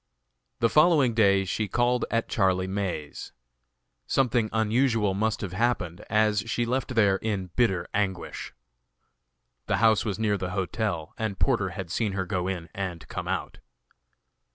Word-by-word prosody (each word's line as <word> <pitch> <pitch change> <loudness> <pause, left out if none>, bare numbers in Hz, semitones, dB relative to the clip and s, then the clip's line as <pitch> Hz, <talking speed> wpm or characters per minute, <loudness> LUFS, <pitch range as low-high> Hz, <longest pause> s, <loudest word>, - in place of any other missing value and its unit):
The 115 - +4
following 150 -5 +4
day 100 -3 +4
she 105 +3 -2
called 120 +4 +1
at 115 0 0
Charlie 95 -2 +1
May's. 95 -6 -4 0.7
Something 120 -4 +2
unusual 110 -2 +2
must 110 +2 -1
have 95 -3 -4
happened, 95 -5 -1
as 105 -1 +3
she 120 +1 0
left 130 +1 -2
there 100 -4 +4
in 95 -4 -3
bitter 95 -8 +1
anguish. 100 -3 -2 1.2
The - - +1
house 110 -2 +4
was 100 -4 -2
near 105 -2 0
the 95 0 -3
hotel 95 -3 -2
and 110 -3 -2
Porter 115 -8 +1
had 95 -3 -6
seen 105 -1 0
her 95 -1 -2
go 90 -2 -2
in 90 -3 -3
and 90 -4 -5
come - - -5
out. - - -3
105 Hz, 150 wpm, -27 LUFS, 95-115 Hz, 1.2 s, The